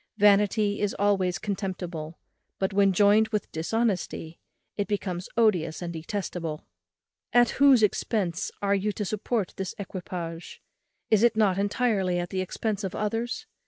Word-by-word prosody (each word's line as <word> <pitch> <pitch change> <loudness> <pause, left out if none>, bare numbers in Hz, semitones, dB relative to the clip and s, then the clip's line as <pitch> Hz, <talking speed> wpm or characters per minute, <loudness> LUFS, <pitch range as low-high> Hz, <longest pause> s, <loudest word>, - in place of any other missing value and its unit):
Vanity 205 0 +4
is 205 -1 0
always 195 -3 +2
contemptible; 180 -6 -4 0.4
but 190 +1 -1
when 200 0 +4
joined 205 +3 +5
with 215 -2 -3
dishonesty, 180 -2 -2 0.4
it 205 - -2
becomes 190 -3 -3
odious 180 -9 +2
and 170 -1 -5
detestable. 165 -2 -4 0.7
At 240 -1 +5
whose 270 -5 +7
expence 200 -3 0
are 200 0 +2
you 200 +1 +1
to 210 - -3
support 215 +1 -2
this 190 -1 -4
equipage? 175 -3 -6 0.5
is 215 -2 +5
it 235 -1 +4
not 195 -3 +3
entirely 200 -3 +1
at 175 0 -3
the 190 - -1
expence 210 +2 -3
of 190 - -3
others? 230 - -2
200 Hz, 140 wpm, -27 LUFS, 180-215 Hz, 0.7 s, whose